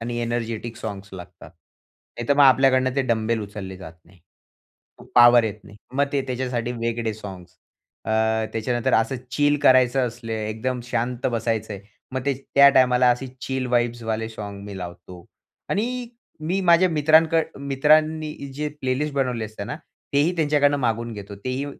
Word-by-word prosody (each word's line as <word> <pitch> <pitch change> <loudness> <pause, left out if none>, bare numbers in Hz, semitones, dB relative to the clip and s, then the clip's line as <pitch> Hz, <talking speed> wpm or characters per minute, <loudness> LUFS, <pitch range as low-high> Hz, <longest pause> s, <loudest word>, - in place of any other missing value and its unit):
आणि 120 +1 -4
energetic 115 -1 -3
songs 100 -3 -7
लागतात. 90 -3 -11
नाहीतर 115 - -6
मग 145 - +5
आपल्याकडनं 130 -1 +4
ते 140 - +3
डंबेल 110 0 0
उचलले 100 -2 -8
जात 90 -3 -10
नाही. 95 +2 -22 1.0
पॉवर 120 -1 +7
येत 110 -3 -2
नाही. 105 - -14 0.2
मग 140 +1 +3
ते 140 -1 +1
त्याच्यासाठी 125 -2 -2
वेगळे 115 -1 -2
साँग्स. 95 -4 -10 0.5
अ, 110 - -4 0.4
त्याच्यानंतर 120 +1 0
असं 115 +4 +1
चिल 145 +2 +2
करायचं 130 0 +4
असले, 115 -1 -6
एकदम 125 +3 -3
शांत 125 0 -2
बसायचंय, 110 -3 -2 0.3
मग 130 - -2
ते 140 - +2 0.2
त्या 140 0 +8
टायमाला 125 -2 +4
असे 125 +2 -1 0.2
चिल 130 -1 -2
वाइब्सवाले 115 -2 -1
साँग 105 -3 -8
मी 100 -1 -8
लावतो. 90 0 -9 0.5
आणि 240 +4 -2 0.3
मी 180 +5 -1
माझ्या 175 0 +5
मित्रांक 160 +1 +4 0.2
मित्रांनी 155 +3 +2 0.2
जे 150 +2 -2
प्लेलिस्ट 140 +3 -1
बनवले 125 -5 -1
असते 105 -1 -7
ना, 145 - -5 0.4
तेही 150 +6 +3
त्यांच्याकडून 145 -2 +2
मागवून 115 -1 -1
घेतो. 100 -1 -8
तेही 130 +2 -2
120 Hz, 150 wpm, -23 LUFS, 110-140 Hz, 1.0 s, त्या